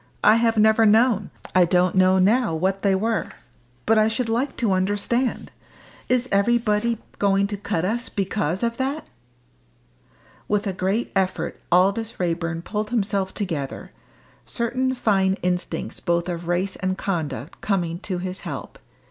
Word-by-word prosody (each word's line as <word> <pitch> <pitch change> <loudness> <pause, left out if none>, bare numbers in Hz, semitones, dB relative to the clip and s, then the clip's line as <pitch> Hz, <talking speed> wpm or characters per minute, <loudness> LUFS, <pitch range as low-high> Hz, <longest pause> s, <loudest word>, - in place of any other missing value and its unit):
I 215 +1 +6
have 230 -1 +2
never 220 +1 +5
known 220 -1 +4 0.2
I 185 - +6
don't 180 +1 +2
know 185 0 +4
now 210 0 +3
what 190 +4 0
they 195 -2 +3
were. 220 +3 -1 0.6
But 220 0 +4
I 215 - +4
should 225 +1 -1
like 245 +5 -1
to 230 -5 +1
understand. 205 +6 -1 0.6
Is 250 0 +2
everybody 230 +2 +2 0.2
going 200 0 +3
to 205 +1 -3
cut 180 -4 -2
us 235 +5 -2
because 195 -2 -2
of 235 0 -1
that?" 275 +4 -2 1.4
With 210 0 0
a 195 - -1
great 190 +6 -1
effort 190 -1 -1
Aldous 200 +6 +2
Raeburn 170 -1 -2
pulled 210 +1 -3
himself 200 -4 -1
together, 160 -9 -4 0.5
certain 255 +2 -1
fine 195 -5 +2
instincts 180 0 -2
both 170 -1 0
of 170 -1 -5
race 180 +2 0
and 185 -1 -2
conduct 155 -6 -4
coming 175 -4 -1
to 185 -2 -4
his 185 +1 -5
help. - - -7
200 Hz, 150 wpm, -23 LUFS, 185-225 Hz, 1.4 s, I